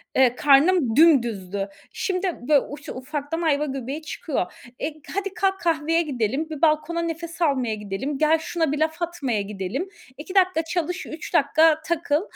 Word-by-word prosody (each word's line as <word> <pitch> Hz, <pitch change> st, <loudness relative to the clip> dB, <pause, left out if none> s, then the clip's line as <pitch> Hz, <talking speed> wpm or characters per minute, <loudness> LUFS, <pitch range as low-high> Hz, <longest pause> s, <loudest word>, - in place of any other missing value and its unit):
Eee, 255 Hz, -2 st, +4 dB
karnım 285 Hz, -3 st, +4 dB
dümdüzdü. 220 Hz, -, +3 dB, 0.2 s
Şimdi 380 Hz, 0 st, -1 dB, 0.2 s
bö 295 Hz, -2 st, +6 dB
uf 290 Hz, +1 st, -9 dB
ufaktan 290 Hz, +5 st, -4 dB
ayva 300 Hz, -3 st, +2 dB
göbeği 270 Hz, +2 st, -4 dB
çıkıyor. 295 Hz, -, -3 dB, 0.3 s
E, -, -, -2 dB, 0.3 s
hadi 395 Hz, -1 st, -2 dB
kalk 385 Hz, 0 st, 0 dB
kahveye 330 Hz, -1 st, +1 dB
gidelim, 275 Hz, 0 st, -2 dB
bir 310 Hz, -1 st, -6 dB
balkona 320 Hz, +1 st, +2 dB
nefes 335 Hz, +1 st, -5 dB
almaya 260 Hz, -8 st, +1 dB
gidelim, 210 Hz, +8 st, -4 dB
gel 310 Hz, +2 st, +4 dB
şuna 325 Hz, -2 st, -1 dB
bir 300 Hz, -, -1 dB
laf 320 Hz, +2 st, 0 dB
atmaya 285 Hz, -11 st, -1 dB
gidelim. 205 Hz, -, -4 dB, 0.3 s
2 315 Hz, +7 st, -8 dB
dakika 370 Hz, -4 st, +3 dB
çalış, 350 Hz, +2 st, -2 dB
3 315 Hz, +3 st, -8 dB
dakika 315 Hz, 0 st, +4 dB
takıl. 325 Hz, -2 st, +1 dB
305 Hz, 155 wpm, -24 LUFS, 265-335 Hz, 0.3 s, bö